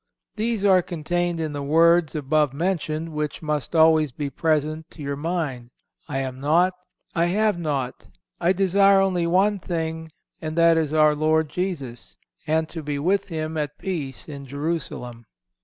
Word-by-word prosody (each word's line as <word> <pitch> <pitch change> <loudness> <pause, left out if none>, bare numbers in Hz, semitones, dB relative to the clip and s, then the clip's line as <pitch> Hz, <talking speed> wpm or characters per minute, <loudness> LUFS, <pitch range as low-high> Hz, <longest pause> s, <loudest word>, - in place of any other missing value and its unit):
These 220 -1 -1
are 190 -2 +6
contained 175 +1 -2
in 155 -2 -2
the 145 - -4
words 165 +3 +4
above 150 -1 +1
mentioned, 165 -1 -1
which 150 0 -4
must 150 0 -2
always 160 -2 +5
be 140 +2 -4
present 155 +2 -1
to 155 - -10
your 140 0 -2
mind, 145 -6 -3 0.4
"I 140 - -2
am 130 -1 -5
naught, 170 +6 +3 0.4
I 170 -1 +2
have 210 0 +1
naught, 140 -6 -3 0.3
I 175 +1 +3
desire 195 +1 +4
only 185 -3 +1
one 195 +4 +2
thing 160 -2 -4 0.3
and 155 0 -4
that 165 0 +6
is 160 -2 0
our 155 -1 +5
Lord 155 +1 +1
Jesus, 150 -10 -5 0.3
and 160 +1 +1
to 165 - -6
be 145 -1 -3
with 195 +7 +1
Him 160 -2 -4
at 150 -1 -3
peace 155 -9 -5
in 140 -3 -8
Jerusalem." 135 -5 -4
160 Hz, 160 wpm, -24 LUFS, 150-175 Hz, 0.4 s, are